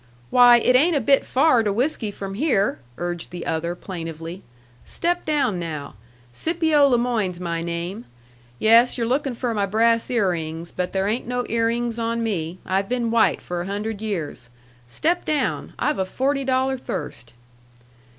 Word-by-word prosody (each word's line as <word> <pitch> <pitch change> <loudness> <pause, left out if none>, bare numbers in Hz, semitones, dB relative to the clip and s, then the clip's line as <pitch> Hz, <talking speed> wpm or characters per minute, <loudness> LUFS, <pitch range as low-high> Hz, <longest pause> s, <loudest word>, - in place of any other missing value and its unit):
"Why, 245 -1 +8
it 250 +2 +3
ain't 315 +6 +4
a - - +3
bit 275 +3 +3
far 260 -2 +4
to 210 -2 0
whiskey 235 0 -1
from 195 -1 -6
here!" 215 -4 +1 0.2
urged 175 -1 -4
the 175 -1 -7
other, 170 +1 -2
plaintively. 165 -1 -7 0.4
"Step 350 +1 -2
down, 275 - +1
now. 155 -4 -5 0.4
Scipio 320 - +3
le 250 -3 +3
Moyne's 220 -7 -1
my 170 -2 -3
name. 170 +6 -4 0.5
Yes, 230 - +5
you're 235 - 0
lookin' 265 +1 0
for 240 0 -2
my 200 -2 0
brass 230 +3 +2
ear 215 -7 +2
rings. 165 0 -5
But 180 0 -3
there 190 0 0
ain't 225 +4 -2
no 245 0 -1
ear 230 0 +1
rings 235 0 -2
on 230 0 -1
me. 175 -6 -2
I've 195 +1 0
been 240 -2 0
white 230 -1 +3
for 175 -1 -3
a 180 - -5
hundred 205 +1 -4
years. 165 - -4 0.4
Step 330 - 0
down. 305 -2 -1
I've 300 - 0
a 190 - +1
forty 275 +7 -1
dollar 265 0 +1
thirst." 120 - -6
225 Hz, 170 wpm, -23 LUFS, 180-250 Hz, 0.5 s, Why